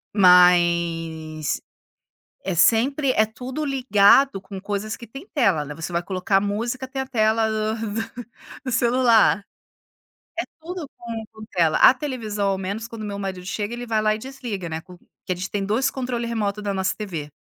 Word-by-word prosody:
mas 170 - +3 0.8
é 190 - -2
sempre 255 - +3
é 215 - +4
tudo 250 +7 -6
ligado 260 -4 +4
com 190 0 -8
coisas 205 +2 -3
que 235 - -11
tem 270 - -10
tela, 195 - +2
né. 150 0 -7
Você 165 +3 -6
vai 170 +1 0
colocar 195 +1 +1
música, 230 +6 -2
tem 265 +1 -4
a 265 - -5
tela 220 -2 +2
do 215 0 -1 0.9
do 255 - -2
celular, 235 -3 +4 1.0
é - - 0 0.2
tudo 345 -2 -6
com 230 -2 -6
com 220 0 -10
tela. 165 -3 +2
A 255 - +8
televisão, 225 -7 -3
ao 195 -1 0
menos 200 +4 -4
quando 230 -2 -7
meu 205 -1 -4
marido 190 -2 -5
chega, 205 +3 -3
ele 245 0 -6
vai 220 -2 +1
lá 215 0 +3
e - - -9
desliga, 235 -7 -6
né, 160 0 -4
com 180 +1 -15 0.3
que 185 - -2
a - - -2
gente 185 +1 -5
tem 200 -1 -2
2 225 +7 +1
controle 245 -2 -3
remoto 210 -3 -2
da 200 -1 -2
nossa 190 -1 -1
TV. 170 -9 -5
215 Hz, 180 wpm, -23 LUFS, 185-240 Hz, 1.0 s, A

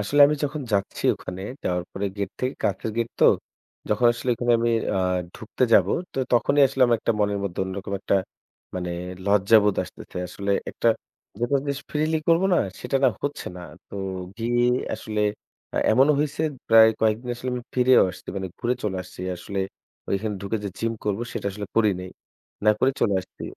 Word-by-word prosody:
আসলে 140 +9 +1
আমি 150 +1 0
যখন 150 +1 -3
যাচ্ছি 100 -1 -1
ওখানে, 90 +1 -8 0.2
যাওয়ার 90 -1 0
পরে 100 - -3
gate 100 -1 -3
থেকে 130 +1 -1
কাঁচের 105 +2 -1
gate 115 0 -1
তো। - - +6 0.6
যখন 105 +3 +3
আসলে 120 +2 -3
ওখানে 120 +1 +1
আমি 120 +1 +1 0.3
আ - - +2 0.4
ঢুকতে 120 +2 -1
যাব 95 -5 +7 0.3
তো - - -5
তখনই 140 +4 +4
আসলে 135 0 -6
আমার 120 -1 +3
একটা 115 - +1
মনের 100 -1 +1
মধ্যে 95 -2 -3
অন্যরকম 95 +1 -5
একটা - - +1 0.6
মানে 90 -1 -3 0.4
লজ্জাবোধ 105 +1 +5
আসতেছে। - - -12
আসলে 100 +2 -4 0.2
একটা 115 - +1 0.5
যেটা 120 +4 +2
জিস 140 0 -1
freely 155 +1 +1
করবো 165 +3 +4
না - - +4 0.2
সেটা 125 +2 0
না - - +7
হচ্ছে 145 0 -3
না। 90 - -8 0.3
তো - - -11 0.4
গিয়ে 120 +1 +1 0.3
আসলে 110 -1 -4 0.5
আ - - -4 0.2
এমনও 135 +6 +5
হইছে 150 +1 -1 0.3
প্রায় 110 0 +8
কয়েকদিন 110 +3 +1
আসলে 125 +2 -4
আমি 125 - -4
ফিরেও 125 0 +6
আসছি। 90 - -14
মানে 95 -1 -3
ঘুরে 120 +1 0
চলে 100 -3 -1
আসছি। 90 0 -12 0.2
আসলে 100 +3 -6 0.5
ওইখানে 105 +2 -1
ঢুকে 100 +3 -1
যে - - -1
gym 115 0 0
করবো 105 +2 -1
সেটা - - -4
আসলে 100 +1 -6
করি 110 -2 +5
নাই। 90 0 -7 0.5
না 105 - +7
করে 135 - +4
চলে 100 - +3
আসছি। 95 - -14
110 Hz, 185 wpm, -24 LUFS, 100-125 Hz, 0.6 s, প্রায়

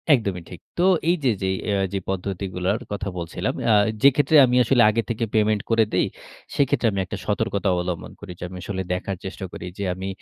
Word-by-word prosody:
একদমই 100 -8 0
ঠিক। 90 - -9 0.2
তো 175 - +2 0.3
এইযে 155 -7 +2
যে - - +1 0.2
আ - - +1 0.4
পদ্ধতিগুলার 95 +1 -2
কথা 100 -1 -3
বলছিলাম। 85 -2 -3 0.2
আ - - +6 0.3
যেক্ষেত্রে 140 +3 +5
আমি 125 0 0
আসলে 120 +1 +3
আগে 110 +2 +1
থেকে 115 0 -1
payment 110 -1 +2
করে 115 -1 +4
দেই। - - +2 0.5
সেক্ষেত্রে 135 -3 +2
আমি 100 - -2
একটা - - -6
সতর্কতা 100 0 -1
অবলম্বন 90 -1 -3
করি। 105 -3 -9
যে - - -7
আমি 90 - -8
আসলে 95 -1 -3
দেখার 95 +1 -3
চেষ্টা 95 0 -5
করি। - - -8
যে 100 - -3
আমি 95 +1 -6
100 Hz, 190 wpm, -23 LUFS, 95-115 Hz, 0.5 s, আ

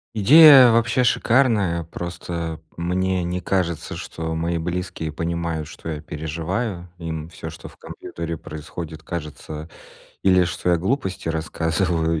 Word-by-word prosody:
Идея 135 +3 +9
вообще 115 +2 +2
шикарная. 110 -9 +2
Просто 85 -1 -5 0.2
мне 90 +1 0
не 90 +1 -2
кажется, 90 -5 -1
что 80 0 -5
мои 85 +1 -1
близкие 85 -2 -3
понимают, 85 -1 -3
что - - -11
я 75 -2 -4
переживаю. 85 +6 -4
Им 80 -2 -5
всё, 80 -1 -8
что 80 - -10
в - - -16
компьютере 85 0 -6
происходит, 80 +1 -8
кажется 80 -1 -6 0.5
или 95 -2 +5
что 90 - -3
я 85 - +4
глупости 95 -2 -2
рассказываю, 80 0 0
85 Hz, 130 wpm, -22 LUFS, 80-95 Hz, 0.5 s, Идея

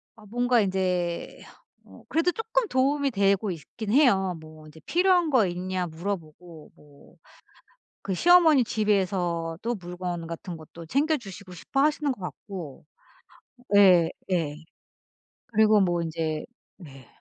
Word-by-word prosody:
아 215 - -17
뭔가 245 +1 +2
이제 180 -3 -2 0.4
어 - - -16
그래도 330 +3 +1
쪼끔 450 +3 -1
도움이 275 +1 +1
되고 200 -1 +1
있긴 205 +6 -7
해요. 195 - +3
뭐 155 0 -14
인제 155 +1 -15
필요한 355 -1 +3
거 240 -7 +4
있냐 180 0 -3
물어보고 165 -2 -7
뭐 145 -1 -20 0.9
그 195 -2 -2
시어머니 325 - +6
집에서도 185 -6 -1 0.2
물건 175 -1 -5
같은 170 +1 -7
것도 160 +1 -12
챙겨주시고 240 - -2
싶어 180 +10 -2
하시는 300 -1 +1
것 250 - -7
같고. 180 - -8 0.9
예. 185 -5 +6 0.2
예. 160 -5 0 0.9
그리고 215 -2 +4
뭐 175 -2 +1
인제 160 -2 -3 0.4
예. 135 -4 -14
190 Hz, 250 characters per minute, -26 LUFS, 170-245 Hz, 0.9 s, 시어머니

